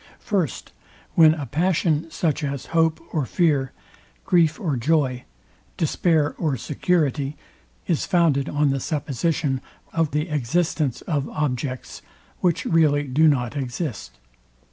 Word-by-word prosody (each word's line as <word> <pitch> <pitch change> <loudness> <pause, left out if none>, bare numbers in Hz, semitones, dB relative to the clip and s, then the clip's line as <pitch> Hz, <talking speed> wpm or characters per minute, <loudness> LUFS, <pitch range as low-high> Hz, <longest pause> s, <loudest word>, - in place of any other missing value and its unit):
First, 185 - -2 0.4
When 160 -2 +6
a 145 -3 -5
passion, 165 +2 0
such 160 -2 -1
as 140 -2 -3
hope 160 -1 +3
or 155 - +1
fear, 145 -7 +1 0.5
grief 170 -4 +3
or 155 -7 -1
joy, 130 -1 +1 0.5
despair 160 -1 +1
or 150 -6 0
security, 150 0 0 0.5
is 165 -4 0
founded 160 -6 +2
on 145 -1 +2
the 135 - -1
supposition 145 -1 -1 0.3
or 165 -1 +2
the 150 +3 -2
existence 150 0 0
of 145 -4 -2
objects, 130 -3 -3 0.4
which 175 -3 +1
really 150 -3 +3
do 145 +4 +3
not 125 -3 +1
exist. 120 - -4
150 Hz, 120 wpm, -23 LUFS, 135-165 Hz, 0.5 s, When